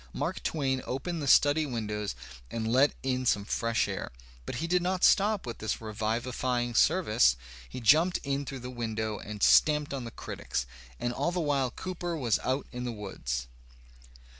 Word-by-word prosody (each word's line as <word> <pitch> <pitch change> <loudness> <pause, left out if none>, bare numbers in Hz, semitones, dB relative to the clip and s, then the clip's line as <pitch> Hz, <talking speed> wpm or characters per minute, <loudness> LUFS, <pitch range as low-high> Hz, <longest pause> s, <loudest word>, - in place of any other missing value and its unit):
Mark - - -3
Twain 135 -4 -1
opened 160 +6 -3
the 140 - -3
study 145 +3 +5
windows 105 -4 -3 0.3
and 115 -1 -3
let 135 +3 +4
in 130 -1 0
some 105 -5 +1
fresh 115 +1 0
air. - - -4 0.4
But - - -4
he 160 - -2
did 180 +1 +2
not 180 +1 -1
stop 205 0 +4
with 120 - -6
this 110 - -2
revivifying 120 +3 -2
service; 120 - +4 0.3
he - - -6
jumped 155 +10 +4
in 140 0 -1
through 135 -1 -7
the 125 +1 -6
window 110 -3 -3
and 105 -1 -6
stamped 150 -2 +5
on 135 -2 -3
the - - -5
critics. 65 - -4 0.3
And 120 - -1
all 170 - 0
the 180 - -2
while 140 -5 +1
Cooper 175 +4 -4
was 120 -7 +1
out 130 +2 -1
in 125 0 -5
the 125 - -2
woods. 65 - -4
125 Hz, 175 wpm, -29 LUFS, 110-150 Hz, 0.4 s, study